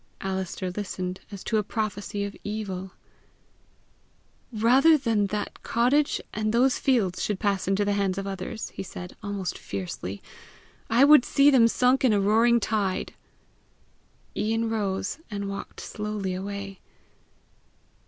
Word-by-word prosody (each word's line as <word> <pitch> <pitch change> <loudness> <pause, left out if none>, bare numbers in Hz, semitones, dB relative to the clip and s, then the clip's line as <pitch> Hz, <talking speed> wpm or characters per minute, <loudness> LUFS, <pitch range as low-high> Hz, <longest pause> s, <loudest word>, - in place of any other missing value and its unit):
Alister 190 -1 -3
listened 185 -1 -4
as 200 -2 -8
to 220 - 0
a 210 - +1
prophecy 205 -1 -3
of 200 0 -5
evil. 195 -3 -5 1.6
"Rather 255 +8 +5
than 225 -7 +1
that 210 +1 -4
cottage 260 +6 +2
and 215 0 -1
those 250 +3 +3
fields 225 -10 +1
should 205 -3 -1
pass 200 -3 0
into 195 +1 +2
the 205 - +1
hands 195 -2 0
of 195 - -3
others," 195 +2 -5
he - - -6
said, 180 -1 -8
almost 200 -3 -4
fiercely, 95 0 -6 0.7
"I 240 +5 +6
would 295 -3 +8
see 280 +3 +4
them 240 -4 +6
sunk 250 +3 +2
in 250 -4 +5
a 205 - +3
roaring 225 +4 +4
tide!" 205 -4 -1 1.2
Ian 225 +1 0
rose, 200 +2 -2
and 200 -2 -4
walked 200 0 -6
slowly 210 -3 -4
away. 195 +1 -5
205 Hz, 135 wpm, -26 LUFS, 195-230 Hz, 1.6 s, would